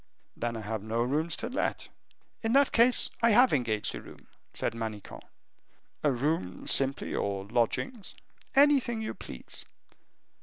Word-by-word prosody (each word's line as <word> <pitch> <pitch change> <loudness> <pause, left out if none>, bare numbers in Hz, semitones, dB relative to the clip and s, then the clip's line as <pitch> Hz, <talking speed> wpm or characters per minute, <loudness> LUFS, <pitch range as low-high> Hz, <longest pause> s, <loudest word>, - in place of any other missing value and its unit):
"Then 120 -1 -3
I - - -5
have 110 0 -4
no 110 +2 -1
rooms 155 +6 0
to - - -4
let." 260 +3 -2 0.5
"In 225 0 0
that 280 0 +5
case, 240 +2 +4
I 230 - +5
have 255 +1 +6
engaged 115 -6 0
a - - -6
room," - - -14 0.3
said - - -2
Manicamp. 110 -3 -6 0.8
"A 150 - +4
room 125 - -2
simply, 135 0 0
or 100 -1 -2
lodgings?" 125 - -1 0.4
"Anything 270 -5 +4
you 215 - -3
please." - - -8
135 Hz, 145 wpm, -29 LUFS, -, 0.8 s, have